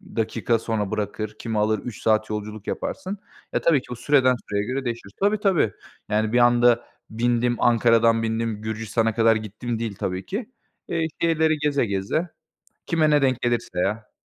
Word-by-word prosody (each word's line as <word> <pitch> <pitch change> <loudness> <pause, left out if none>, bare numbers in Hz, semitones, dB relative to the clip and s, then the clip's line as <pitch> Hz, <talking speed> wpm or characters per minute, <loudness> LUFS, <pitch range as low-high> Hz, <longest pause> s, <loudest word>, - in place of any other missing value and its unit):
dakika 115 0 0
sonra 110 -3 -2
bırakır. 110 0 -3
Kimi 110 -2 -3
alır? 110 0 +2
3 120 -4 -8
saat 110 0 +2
yolculuk 105 0 -5
yaparsın. 195 +2 -4 0.4
Ya - - +1
tabii 150 -6 +3
ki - - -18
bu - - -3
süreden 130 0 +3
süreye 100 0 0
göre 130 +2 -3
değişir. 115 -4 -4
Tabii 205 +1 +2
tabii. 185 - +2 0.4
Yani 110 +1 0
bir 125 - +4
anda 120 0 +4 0.2
bindim, 120 +1 +1
Ankara'dan 115 -1 +4
bindim, 110 -1 -2
Gürcistan'a 110 0 -1
kadar 115 -1 +4
gittim 110 +2 -4
değil 110 -4 -3
tabii 95 0 -3
ki. 215 +4 -4 0.4
Eee, 165 -1 0
şehirleri 160 -2 +2
geze 145 -4 +1
geze. 100 - -1 0.6
Kime 155 -2 +2
ne 150 -1 +4
denk 130 -2 +1
gelirse 120 -6 -1
ya. 110 +4 -2
115 Hz, 170 wpm, -24 LUFS, 110-130 Hz, 0.6 s, bir